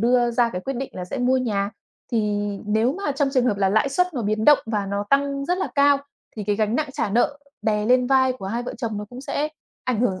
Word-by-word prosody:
đưa 240 +1 +3
ra 235 0 +2
cái 180 - -3
quyết 270 +5 -4
định 270 +2 -4
là 180 - -5
sẽ 255 +9 -5
mua 255 +1 +3
nhà, 205 -5 0 0.4
thì 230 - +2 0.5
nếu 220 +4 +2
mà 335 -4 -2
trong 280 0 +1
trường 255 -2 +3
hợp 210 -4 +1
là 195 -1 +2
lãi 220 +7 +2
suất 360 +5 0
nó 245 - -2
biến 215 +1 0
động 295 -1 +7
và 210 -3 -1
nó 200 +1 -2
tăng 275 0 +2
rất 355 +3 0
là 385 - -1
cao 285 0 +5 0.4
thì 210 - -4
cái 205 0 0
gánh 215 +1 +1
nặng 310 -1 -1
trả 205 - -1
nợ 245 +6 +1 0.2
đè 210 -1 +1
lên 250 0 +4
vai 260 -1 +4
của 220 -7 -8
hai 235 +4 -2
vợ 245 - -6
chồng 220 -3 -3
nó 210 - -4
cũng 250 +1 -8
sẽ 295 +2 -2 0.4
ảnh 245 -4 0
hưởng 190 -6 0
245 Hz, 265 wpm, -23 LUFS, 210-275 Hz, 0.5 s, động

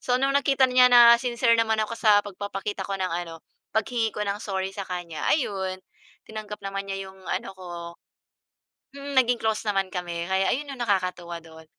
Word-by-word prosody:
So 250 - +1
nung 270 +2 +1
nakita 275 -1 +3
niya 250 0 +6
na 240 -1 +8
sincere 235 -1 +2
naman 225 -1 +2
ako 215 +1 -4
sa 210 -2 +5
pagpapakita 200 0 -5
ko 195 - -2
ng 185 -1 -2
ano, 170 -1 -5 0.4
paghingi 225 0 +1
ko 210 - -2
ng 200 0 -3
sorry 190 -3 -3
sa 195 0 -5
kanya, 175 -3 -5
ayun, 195 -10 0 0.5
tinanggap 215 -1 -7
naman 195 0 -4
niya 195 0 -4
yung 190 - -18
ano 195 +2 -3
ko. 185 - -11 1.3
Mm, 280 0 -6
naging 245 -1 +2
close 220 -1 -1
naman 195 -2 +1
kami, 175 -2 -4
kaya 190 +1 +1
ayun 285 +2 -2
yung - - -16
nakakatuwa 180 -6 -1
dun. 160 0 -14
205 Hz, 185 wpm, -25 LUFS, 190-235 Hz, 1.3 s, na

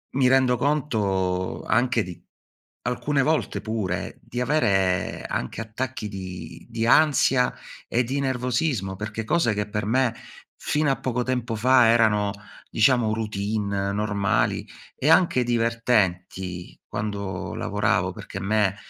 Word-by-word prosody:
mi 130 -2 +4
rendo 130 -1 +4
conto 100 -10 0
anche 120 -2 +2
di 90 -2 -10 0.6
alcune 140 +3 0
volte 155 +2 0
pure, 105 -5 -3
di 120 - -5
avere 95 -10 +1
anche 65 - -3
attacchi 115 +1 -4
di 90 -4 -8
di 115 0 -1
ansia 135 -3 +4 0.4
e 125 +2 +1
di 135 +4 -2
nervosismo. 125 - -1
Perché 110 +3 -5
cose 120 -3 +2
che 105 0 -2
per 105 -1 -3
me 125 +1 +2 0.4
fino 150 0 0
a 135 - +2
poco 125 -1 -1
tempo 125 -2 -2
fa 125 +1 +5
erano, 110 -3 +3 0.4
diciamo, 115 0 +3
routine, 100 -2 -2
normali 100 -2 0 0.3
e 145 - -1
anche 165 -6 +4
divertenti 105 -7 -1
quando 100 -3 -4
lavoravo, 95 -3 0
perché 95 - -8
a - - -7
me, 100 0 +1
110 Hz, 125 wpm, -24 LUFS, 100-125 Hz, 0.6 s, fa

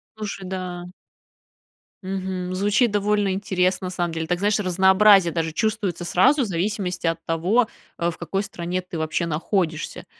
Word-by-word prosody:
Слушай, 205 -3 -6
да. 180 -1 -5 1.2
Мгм. 185 -1 -3
Звучит 205 +4 +2
довольно 205 -1 +1
интересно, 185 -1 0
на 180 - -4
самом 175 -2 -2
деле. 160 0 -2
Так, 175 0 0
знаешь, 205 +1 +2
разнообразие 190 0 +5
даже 165 -1 -1
чувствуется 195 -1 -1
сразу, 265 - +3
в - - +1
зависимости 180 -1 -2
от 165 0 0
того, 185 +9 +2 0.3
э, 170 0 +1
в 165 - -7
какой 195 0 -2
стране 180 -1 -4
ты, 180 -2 -8
вообще, 160 +2 -1
находишься. 160 0 -2
185 Hz, 155 wpm, -23 LUFS, 175-205 Hz, 1.2 s, разнообразие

